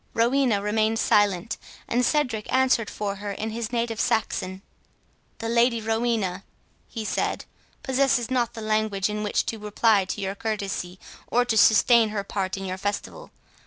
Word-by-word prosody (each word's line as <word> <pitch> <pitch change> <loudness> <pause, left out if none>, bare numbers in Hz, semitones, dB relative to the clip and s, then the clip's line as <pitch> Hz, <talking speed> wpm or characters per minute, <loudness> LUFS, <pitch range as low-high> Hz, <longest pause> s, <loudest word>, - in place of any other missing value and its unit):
Rowena 235 -3 +2
remained 215 +1 +1
silent, 205 -2 +2 0.3
and 245 +2 +1
Cedric 250 -6 0
answered 260 -4 +2
for 200 -1 -4
her 205 0 -5
in 220 +3 -4
his 230 0 -4
native 230 -2 -1
Saxon. 190 -3 -1 0.7
"The 225 - -5
Lady 235 0 +3
Rowena," 220 -4 -1 0.4
he 225 -2 -6
said, - - -1 0.4
"possesses 260 -3 +1
not 245 -2 0
the 225 - -6
language 215 -2 0
in 210 0 -3
which 210 - 0
to 225 - -4
reply 210 -1 +2
to 190 - -4
your 195 -1 -2
courtesy, 200 -4 -4 0.3
or 245 +1 +2
to 235 -2 0
sustain 220 +1 +5
her 210 -2 -3
part 195 -1 -3
in 195 - -5
your 185 0 -4
festival. 205 +1 -4
220 Hz, 160 wpm, -25 LUFS, 200-235 Hz, 0.7 s, sustain